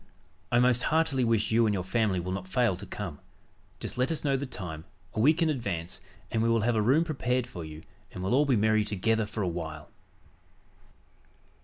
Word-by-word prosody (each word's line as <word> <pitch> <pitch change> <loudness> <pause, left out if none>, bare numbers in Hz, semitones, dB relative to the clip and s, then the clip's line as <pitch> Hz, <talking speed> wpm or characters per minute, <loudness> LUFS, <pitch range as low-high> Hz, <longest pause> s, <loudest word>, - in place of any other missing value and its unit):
I 120 - +4
most 125 0 +4
heartily 155 -4 +2
wish 115 -2 +1
you 115 0 +4
and 105 - +1
your 90 - -2
family 100 -1 +1
will 90 +1 -4
not 95 0 -4
fail 115 0 +2
to 100 +3 -9
come. 90 -8 -6 0.6
Just - - -6
let 130 +5 +2
us 160 - -3
know 140 -2 +2
the 135 +1 -2
time, 85 -9 -7 0.3
a - - -3
week 155 +8 +4
in 160 - +2
advance, 90 - -4 0.3
and 110 - +1
we 115 - +2
will 115 -1 +3
have 115 +2 +1
a 110 - +3
room 135 +9 +4
prepared 130 -6 -1
for 90 -9 -8
you 80 0 -9 0.3
and 90 - -6
we'll 95 - 0
all 145 +3 +4
be 130 - +4
merry 110 0 +3
together 110 +2 0
for 105 -1 -3
a - - 0
while." 80 -3 -5
110 Hz, 210 wpm, -29 LUFS, 95-125 Hz, 0.6 s, I